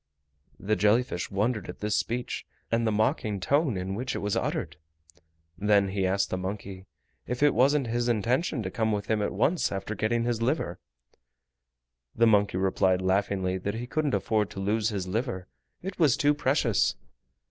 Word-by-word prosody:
The 110 +2 0
jelly 105 +5 +4
fish 90 -8 -5
wondered 105 0 -1
at 90 - -7
this 105 0 -1
speech 120 +2 -2 0.2
and 115 0 +2
the - - +2
mocking 110 -1 0
tone 140 - +1
in 95 +1 -3
which 125 +5 -3
it - - -1
was 105 -1 -1
uttered. - - -2 0.8
Then 100 -1 +3
he 95 -1 0
asked 100 +1 0
the 90 - -1
monkey 95 0 -6 0.4
if 125 +3 -2
it 145 - +5
wasn't 135 +3 +3
his 120 +1 -1
intention 120 - 0
to 95 - -4
come 110 +1 0
with 105 -1 -1
him 110 -1 +2
at 105 - -1
once 170 +3 +1
after 100 +2 -3
getting 110 +3 0
his 120 -1 -1
liver. 115 - -1 1.4
The 115 - +4
monkey 105 -4 +3
replied 95 -1 +2
laughingly 95 -1 0
that 100 +3 -3
he 120 +2 -4
couldn't 150 +2 0
afford 110 -3 0
to - - -8
lose 105 +3 +1
his 100 -4 -3
liver: 100 -2 -3 0.4
it 190 0 -6
was 150 -7 +4
too 145 0 +3
precious. 135 -6 +1
110 Hz, 180 wpm, -27 LUFS, 95-120 Hz, 1.4 s, it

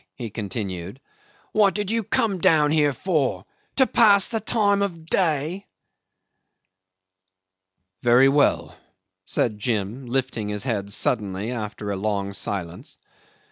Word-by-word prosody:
he 120 -5 -6
continued. 100 -1 -5 0.5
"What 205 -2 +3
did 205 -1 -2
you 230 0 +1
come 220 -3 0
down 160 -5 +4
here 150 -2 +3
for? 135 - -1 0.3
To 265 - +4
pass 205 -6 +5
the 225 - -1
time 205 -2 +1
of 170 -5 -3
day?" 165 +2 0 2.3
'"Very 120 +2 +5
well," 140 +1 +2 0.5
said 105 +2 -1
Jim, 110 +3 -3
lifting 120 -4 -2
his 105 0 -2
head 100 -6 -3
suddenly 105 0 -1
after 105 -3 -5
a 100 - -2
long 100 -1 -2
silence. 90 -4 -5
130 Hz, 120 wpm, -23 LUFS, -, 2.3 s, pass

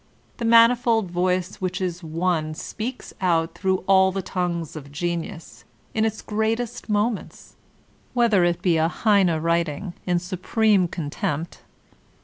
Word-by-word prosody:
The 235 - -3
manifold 230 -3 +4
voice 180 +1 0
which 180 -1 -2
is 180 -1 -3
one 160 -1 -1
speaks 240 +9 -6
out 165 -3 +1
through 190 -1 -1
all 190 -1 +5
the 195 0 -3
tongues 170 -4 -3
of 140 -2 -9
genius 160 - -5 0.3
in 220 0 +1
its 220 -1 -3
greatest 220 +3 -2
moments, 210 +1 -2 0.6
whether 230 -6 +4
it 175 -1 0
be 175 -3 +3
a 160 0 +3
Heine 190 -3 +2
writing, 170 +2 -1
in 175 -1 +2
supreme 185 +2 +1
contempt. 160 -1 -4
180 Hz, 130 wpm, -23 LUFS, 170-215 Hz, 0.6 s, all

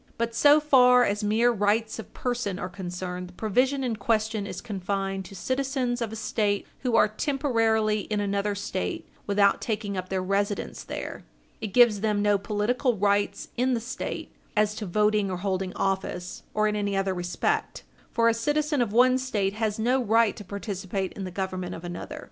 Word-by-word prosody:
But 230 0 -1
so 290 +6 +6
far 250 -4 +6
as 205 -1 0
mere 225 +4 +3
rights 215 +1 +1
of 225 - -8
person 240 -6 -2
are 180 -2 -4
concerned, 180 0 -5
the - - -15
provision 255 +8 +1
in 235 -4 -1
question 215 -1 0
is - - -5
confined 195 -2 -3
to 195 - -11
citizens 260 +3 -1
of 225 -2 -2
a - - -5
State 210 -2 0
who 250 -3 0
are 225 - +6
temporarily 225 -3 +1
in 210 -1 0
another 200 0 0
State 200 -2 -3 0.2
without 200 -1 +3
taking 210 -3 -2
up 185 0 -4
their 190 -1 -1
residence 200 +2 -1
there. - - -6 0.4
It 220 - -2
gives 225 0 +5
them 210 -1 +1
no 205 -1 +3
political 220 +4 0
rights 200 0 +1
in 255 +1 +2
the - - -1
State 245 +4 -5 0.2
as 210 0 +3
to 210 - -4
voting 210 +2 +2
or 185 - -2
holding 190 0 -2
office, 190 -2 -2
or 215 0 +3
in 210 - 0
any 200 -1 -1
other 195 -1 0
respect. 175 0 -2 0.3
For 230 -1 +2
a 230 - +5
citizen 295 +4 0
of 230 -4 0
one 255 +3 +5
State 205 -7 -1
has 215 -1 -1
no 250 +4 +2
right 225 0 +3
to 210 - -9
participate 195 -1 -4
in 195 - -5
the - - -4
government 185 -1 -4
of 165 - -9
another. 175 0 -6
210 Hz, 185 wpm, -26 LUFS, 195-235 Hz, 0.4 s, so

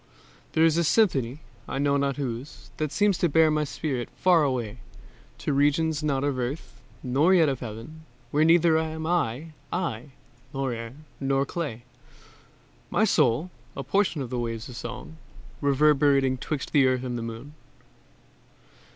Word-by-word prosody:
There 160 - +4
is 165 0 +3
a 170 - +3
symphony, 145 - +2 0.3
I - - -4
know 140 0 +2
not 140 -1 0
whose, 130 +1 -6
That 155 -2 -2
seems 205 -3 +2
to 175 - +2
bear 160 +1 +4
my 150 0 +1
spirit 140 -4 -3
far 175 -4 +4
away, 125 -4 -2 0.6
To 145 - -2
regions 145 +2 +2
not 140 -3 0
of 140 -3 -1
Earth 130 +6 -5 0.2
nor 145 +8 +3
yet 165 -4 +5
of 135 -3 -2
Heaven, 125 +8 -9 0.3
Where 150 +2 +3
neither 165 0 +5
am 160 0 -4
I 160 -3 -1 0.2
I, 145 -7 -3 0.4
nor 135 -2 -1
air, 115 0 -6 0.3
nor 135 0 +1
clay, 140 -8 -5 1.1
My 215 - +2
soul, 155 - +2 0.3
a - - -3
portion 190 -7 0
of 120 - -8
the 125 - -2
waves 115 +1 -4
of 125 - -9
song, 125 +7 -7 0.4
Reverberating 140 -2 +3
'twixt 150 0 -4
the 140 -3 +5
earth 130 0 0
and 125 -1 -3
moon. 115 +5 -7
140 Hz, 155 wpm, -26 LUFS, 125-160 Hz, 1.1 s, yet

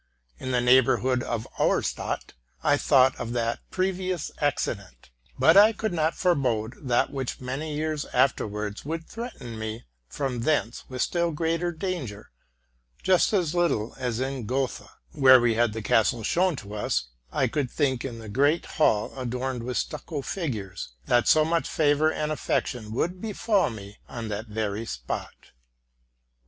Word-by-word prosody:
In 130 - -5
the 125 -1 +2
neighborhood 125 0 +4
of 115 -2 -3
Auerstadt - - 0 0.3
I 145 - +4
thought 130 -2 +4
of 115 - -4
that 115 -1 -1
previous 185 -2 -1
accident; 100 - -2 0.3
but - - +6
I 210 +3 +8
could 220 -1 -2
not 160 -1 +1
forebode 130 -10 +1
that 120 +1 +2
which 135 -3 -4
many 140 +4 -4
years 155 -1 -2
afterwards 105 -5 0
would 165 +3 -4
threaten 175 - -7
me 110 +1 -5 0.3
from 125 - -2
thence 120 -3 0
with 130 -1 -1
still 170 -1 0
greater 165 +2 0
danger, 160 - -5 0.7
just 185 -2 +4
as 180 -7 +1
little 170 -11 +1
as 125 -3 -2
in 130 -3 -3
Gotha, 130 +1 -2 0.2
where 130 -3 +7
we 120 -1 +3
had 115 0 +2
the 110 0 -5
castle 115 +2 +2
shown 180 - +2
to 105 -5 -9
us, 105 -11 -1 0.2
I 130 - +1
could 135 +1 -1
think 130 -4 0
in 120 -4 -5
the 110 -1 -9
great 140 +10 +2
hall 110 - +1
adorned 125 0 -3
with 125 +1 -3
stucco 150 -1 -3
figures, 105 - -4
that 120 +6 +3
so 155 -1 +5
much 165 +1 0
favor 155 0 +3
and 155 -1 -2
affection 120 -6 -2
would 175 +10 -2
befall 210 -4 +1
me 105 -3 -10
on 115 -3 -5
that 105 +2 -4
very 110 0 -3
spot. - - -6
130 Hz, 155 wpm, -26 LUFS, 115-155 Hz, 0.7 s, I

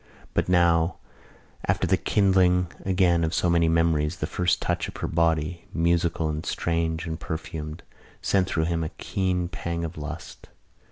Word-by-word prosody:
But - - 0
now, 85 -1 +3 0.7
after - - +2
the - - +3
kindling 90 -3 +3
again 90 -3 +3
of 80 +1 0
so 90 - +2
many 85 -1 +3
memories, 80 -2 +2
the - - -3
first 90 -1 +1
touch - - -1
of - - -9
her - - -2
body, 80 +1 0
musical 85 -1 +1
and 75 0 -3
strange 80 -1 -1
and 80 -1 -4
perfumed, 80 0 -5 0.4
sent 95 -2 +1
through 80 -3 0
him 85 -1 0
a 80 - -2
keen 90 -2 -1
pang 85 -2 -3
of 80 0 -7
lust. 75 +3 -8
85 Hz, 160 wpm, -26 LUFS, 80-90 Hz, 0.7 s, now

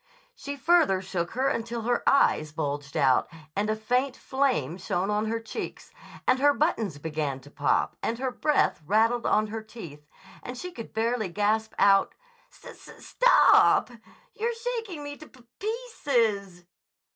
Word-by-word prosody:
She 285 0 -7
further 310 - +3
shook 185 -2 -4
her 260 +3 0
until 230 -2 -2
her 240 +1 0
eyes 155 - +3
bulged 145 -1 -4
out 135 -4 +3 0.3
and 210 +2 0
a 215 - +1
faint 250 +5 -1
flame 250 - -1
shone 185 +3 -1
on 210 +1 0
her 230 +1 -1
cheeks, 225 -1 -7 0.4
and 255 0 +4
her 285 +1 +4
buttons 225 - 0
began 150 -3 -3
to 145 +2 -16
pop, 145 - 0
and 230 - -2
her 260 +1 -2
breath 300 - +1
rattled 225 +4 +2
on 215 - +3
her 225 - -3
teeth, 165 -10 -11 0.3
and 250 +1 -7
she 360 +7 -6
could 230 -9 -9
barely 225 -2 -1
gasp 215 +4 0
out: 195 -1 +4 0.3
"St - - -14
t - - -12
t - - -15 0.2
top! - - +6 0.4
You're 465 +1 -2
shaking 455 -9 -4
me 290 0 -7
to 310 - -13
p 260 - -20
p 235 - -28
pieces!" 240 - -1
225 Hz, 165 wpm, -27 LUFS, 185-275 Hz, 0.4 s, top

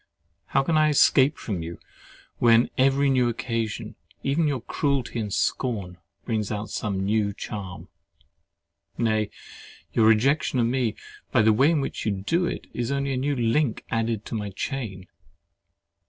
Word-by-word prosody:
How 135 - +2
can 160 +3 +1
I 155 0 +4
escape 140 0 +4
from 95 -7 -4
you, 85 +1 -6 0.6
when 115 0 +5
every 135 +2 +3
new 130 -3 +3
occasion, 115 -2 -3 0.3
even 150 +4 +1
your 140 -4 -1
cruelty 135 -2 -1
and 105 -2 -3
scorn, 100 -3 -1 0.3
brings 110 -3 -1
out 105 0 -4
some 95 -3 -2
new 105 0 +1
charm. 95 -5 -7 1.1
Nay, 110 -2 +1 0.6
your 110 - +4
rejection 130 +6 +3
of 120 - +3
me, 120 -2 0 0.4
by 120 -5 +4
the 110 0 +5
way 135 +8 +4
in 160 -4 +2
which - - -4
you - - 0
do 165 - 0
it, - - -4
is 120 +2 -2
only 140 0 -1
a - - -1
new 140 +2 0
link 120 +1 0
added 115 -2 -1
to - - -7
my 105 -2 -2
chain. 100 -3 -5
115 Hz, 155 wpm, -25 LUFS, 105-135 Hz, 1.1 s, when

